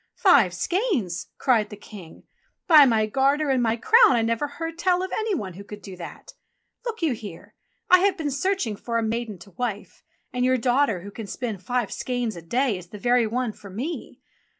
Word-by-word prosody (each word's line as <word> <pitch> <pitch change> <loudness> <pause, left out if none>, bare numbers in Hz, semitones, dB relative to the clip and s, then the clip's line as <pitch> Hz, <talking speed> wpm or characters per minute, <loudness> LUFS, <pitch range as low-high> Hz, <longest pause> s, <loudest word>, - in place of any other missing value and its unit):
"Five 250 - +5
skeins!" 315 - -1
cried 225 -6 +2
the 210 - -8
King. 195 -5 -12 0.4
"By 310 -5 +8
my 220 -3 +2
garter 275 +6 +1
and 260 -2 +2
my 230 -1 +2
crown, 450 - +6
I 230 - +2
never 230 +5 0
heard 330 +3 -6
tell 360 +1 +2
of 375 - -5
any 435 -2 -1
one 195 - -5
who 195 +3 -10
could 205 0 -11
do 190 -1 -9
that! 175 -2 -10 0.5
Look 450 -6 -4
you 310 -5 +2
here, 205 -7 -10 0.3
I 365 - +7
have 390 +1 +2
been 300 -3 -2
searching 280 - -1
for 230 +3 -3
a 230 - 0
maiden 225 -2 -3
to 185 +3 -15
wife, 210 0 -5 0.3
and 250 0 -1
your 255 0 +3
daughter 245 -5 +1
who 200 +3 -9
can 220 0 -8
spin 225 -3 -4
five 235 +3 -2
skeins 245 -3 -2
a 170 - -8
day 235 +4 0
is 175 - -13
the 210 - -10
very 240 +1 +2
one 240 0 -2
for 200 - -13
me. 255 - -6
240 Hz, 205 wpm, -24 LUFS, 210-290 Hz, 0.5 s, By